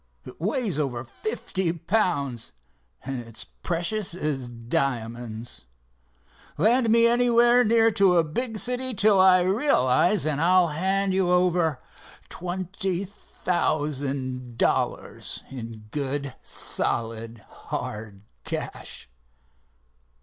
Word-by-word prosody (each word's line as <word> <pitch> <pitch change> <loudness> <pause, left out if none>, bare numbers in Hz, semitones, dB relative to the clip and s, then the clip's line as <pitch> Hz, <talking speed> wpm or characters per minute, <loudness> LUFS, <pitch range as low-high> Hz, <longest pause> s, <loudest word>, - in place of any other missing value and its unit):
It 125 - -12
weighs 205 - -1
over 130 -5 -2
fifty 190 - -3
pounds, 165 - -1 0.5
and 135 -1 -3
it's 115 -2 -5
precious 175 +3 -2
as 145 -7 -2
diamonds. 115 - -3 0.9
Land 230 - +3
me 230 +1 +6
anywhere 240 +1 +5
near 225 0 +4
to 195 -4 +4
a 165 - +5
big 225 +9 -3
city 250 +2 0
till 205 0 +4
I 185 -1 +6
realize, 185 - +2
and 150 -1 0
I'll 180 0 +4
hand 190 +5 0
you 190 -1 +2
over 175 -6 +2 0.5
twenty 185 +1 -3
thousand 140 - -2
dollars - - -1
in 115 -4 -8
good, 140 -1 -3
solid, 115 0 -3
hard 105 -2 -6 0.2
cash." - - -5
170 Hz, 100 wpm, -25 LUFS, 130-200 Hz, 0.9 s, me